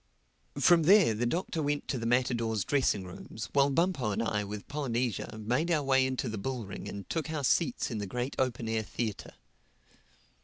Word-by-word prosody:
From 175 -2 +5
there 185 - +6
the 120 +3 -1
Doctor 165 +3 -2
went 145 0 -1
to 130 - -1
the 115 - -2
matadors' 115 -4 +1
dressing 130 -8 +1
rooms 90 +2 -8
while 140 0 +4
Bumpo 160 - +1
and 100 - -1
I 105 -2 0
with 105 0 -7
Polynesia 120 -7 -2
made 125 +10 0
our 155 -4 +2
way 135 -1 +3
into 130 0 -2
the 110 -2 -4
bull 125 +1 -3
ring 95 - -7
and 100 -1 -7
took 165 -1 -2
our 155 -2 -3
seats 130 0 +1
in 110 - -3
the 100 - -4
great 125 +6 -3
open 120 -3 0
air 110 0 0
theatre. 110 -1 -5
125 Hz, 190 wpm, -30 LUFS, 110-145 Hz, -, there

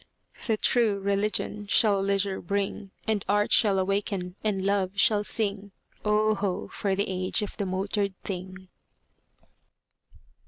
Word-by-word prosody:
The 220 -2 +2
True 220 -4 +2
Religion 200 +1 -1
shall 200 -1 +4
leisure 195 0 0
bring; 200 +1 -2 0.2
And 215 -3 +1
Art 205 +1 +2
shall 205 -4 +4
awaken 190 -1 -1
and 195 -3 -1
Love 195 -2 +1
shall 210 +1 +4
sing: 200 -1 -1 0.3
Oh, 215 +1 +3
ho! 195 -3 -2
for 195 -2 -1
the 200 +1 0
age 185 +3 -1
of 205 - -6
the 200 - -2
motored 195 +1 -2
thing! 185 0 -7
200 Hz, 130 wpm, -27 LUFS, 190-210 Hz, 0.3 s, shall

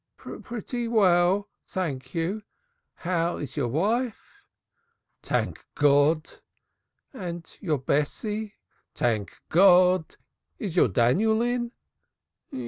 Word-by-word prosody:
"Pretty 240 +1 -6
well, 195 -2 +3 0.2
thank 135 -8 -4
you. 175 +6 -1 0.5
How 170 -1 -1
is 135 -3 -6
your 140 -5 0
wife?" 215 - -2 0.8
"Tank - - -2
Gawd!" 145 +2 +2 0.7
"And 175 -8 -6 0.2
your 160 -7 0
Bessie?" 210 - -2 0.4
"Tank 110 -4 -1
Gawd! 180 -1 +5 0.4
Is 195 -8 -5
your 175 - +5
Daniel 195 - +2
in?" 240 -1 -1
180 Hz, 90 wpm, -26 LUFS, 150-215 Hz, 0.8 s, Gawd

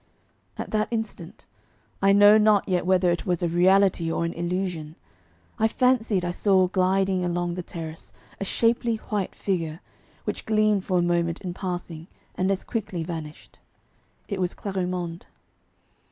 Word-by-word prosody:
At - - -5
that 215 0 +1
instant, 225 -1 -5 0.6
I 195 0 +5
know 205 +2 +7
not 210 -2 +4
yet 180 -2 0
whether 185 -1 +3
it 170 - -3
was 175 -1 0
a - - +2
reality 180 0 +3
or 170 - -1
an 170 - -3
illusion, 170 -3 -3 0.6
I 220 - +4
fancied 225 -6 +1
I 175 - -1
saw 185 0 +3
gliding 190 0 +1
along 175 0 -1
the 180 - -4
terrace 165 -2 -8 0.3
a - - -2
shapely 230 +3 +1
white 210 -3 -3
figure, 165 -5 -2 0.4
which - - -5
gleamed 215 -3 +2
for 185 - +1
a - - +3
moment 170 -1 0
in 180 -2 -4
passing 175 -3 -5 0.3
and 185 +1 0
as 195 -1 0
quickly 195 -7 -3
vanished. 160 -2 -8 0.7
It 200 -3 -3
was 180 0 -1
Clarimonde. 180 -3 -4
185 Hz, 155 wpm, -25 LUFS, 175-200 Hz, 0.7 s, know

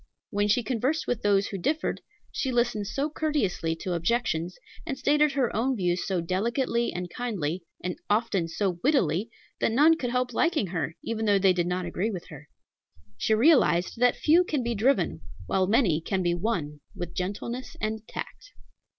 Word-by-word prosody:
When 205 +1 +1
she 225 +4 +2
conversed 255 +7 0
with 245 - -1
those 200 -1 +2
who 195 - -5
differed, 305 - -1 0.3
she 265 - -2
listened 235 -4 0
so 280 +7 -1
courteously 285 - -1
to 180 +2 -4
objections, 175 -2 -1 0.3
and 280 -5 -4
stated 295 +2 +3
her 265 -4 0
own 255 +4 +1
views 180 -2 0
so 185 -3 0
delicately 235 +7 0
and 180 0 -4
kindly, 185 -6 -3 0.2
and 180 0 -3
often 205 -5 +1
so 180 +1 -2
wittily, 220 - +2 0.3
that - - +1
none 300 +7 +5
could 245 - -2
help 250 0 -1
liking 330 - +2
her, 165 -3 -3
even 225 -1 -2
though 205 -1 +4
they 190 -1 +4
did 175 -1 0
not 180 0 -1
agree 180 +5 -1
with 185 -6 -6
her. 150 -1 -12 0.7
She 220 - +2
realized 230 - +3
that 245 0 +4
few 330 +4 +4
can 300 -7 -1
be 235 0 -1
driven, 200 - +1 0.2
while 185 - +1
many 200 - +3
can 190 +2 -1
be 175 0 +2
won 170 -6 -2 0.2
with 175 -1 -6
gentleness 210 +7 -4
and 215 +1 -2
tact. - - -8
210 Hz, 175 wpm, -27 LUFS, 180-250 Hz, 0.7 s, none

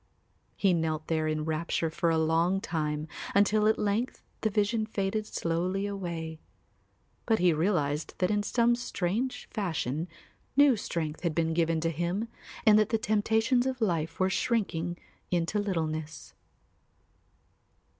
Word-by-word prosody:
He 195 -3 +3
knelt 160 -2 -1
there 160 -1 +1
in 155 0 0
a - - -3
rapture 160 +1 -1
for 170 +1 0
a 165 - +2
long 165 +4 +2
time 150 -4 -2 0.3
until 210 +1 +4
at 220 - +3
length 210 +5 -1 0.2
the 220 - +2
vision 215 +1 +1
faded 210 0 -2
slowly 180 +4 -1
away. 170 -5 -4 0.9
But 225 -2 +4
he 180 -3 +4
realised 155 -3 0
that 180 +2 +1
in 205 0 +2
some 235 +3 +2
strange 240 +2 -2
fashion 165 - -2 0.5
new 285 -3 +7
strength 160 -6 -3
had 170 -4 -1
been 165 -1 +1
given 165 -1 +1
to 165 0 +1
him 175 +8 -2 0.4
and 215 -1 +7
that 215 - +2
the 225 - +2
temptations 220 +3 +2
of 260 -1 -2
life 165 -7 -1
were 190 0 +2
shrinking 175 -7 0 0.3
into 175 +3 0
littleness. 160 -6 -3
180 Hz, 145 wpm, -29 LUFS, 160-215 Hz, 0.9 s, new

